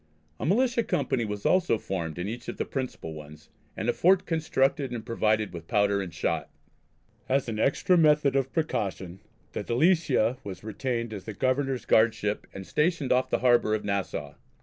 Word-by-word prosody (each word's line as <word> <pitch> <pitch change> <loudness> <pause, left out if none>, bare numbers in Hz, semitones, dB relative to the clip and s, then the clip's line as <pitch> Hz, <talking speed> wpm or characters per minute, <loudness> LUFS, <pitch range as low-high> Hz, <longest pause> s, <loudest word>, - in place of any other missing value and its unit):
A - - -2
militia 235 +5 +2
company 130 - 0
was 105 -1 -5
also 180 -10 +3
formed 85 -6 -4
in 90 +2 -3
each 120 +3 -6
of - - -5
the - - -1
principal 130 - -5
ones, 75 0 -12 0.3
and - - -3
a - - +3
fort 185 +2 +3
constructed 145 -4 +1
and 120 -2 -6
provided 110 -3 0
with 85 -1 -8
powder 100 -2 +2
and 90 -3 -5
shot. 80 - -2 0.8
As 135 0 +1
an 110 -2 -3
extra 175 +8 +3
method 150 -3 +4
of 135 -1 +1
precaution 95 - -2 0.3
the - - -4
Delicia 130 -3 +2
was 100 -1 -8
retained 115 +1 -3
as 100 -3 -7
the 110 - -5
Governor's 130 +1 0
guardship 110 -2 +2
and 95 0 -8
stationed 150 - 0
off 130 +1 +2
the - - 0
harbour 120 -3 +4
of 105 - -5
Nassau. 100 -1 -2
120 Hz, 175 wpm, -27 LUFS, 100-140 Hz, 0.8 s, method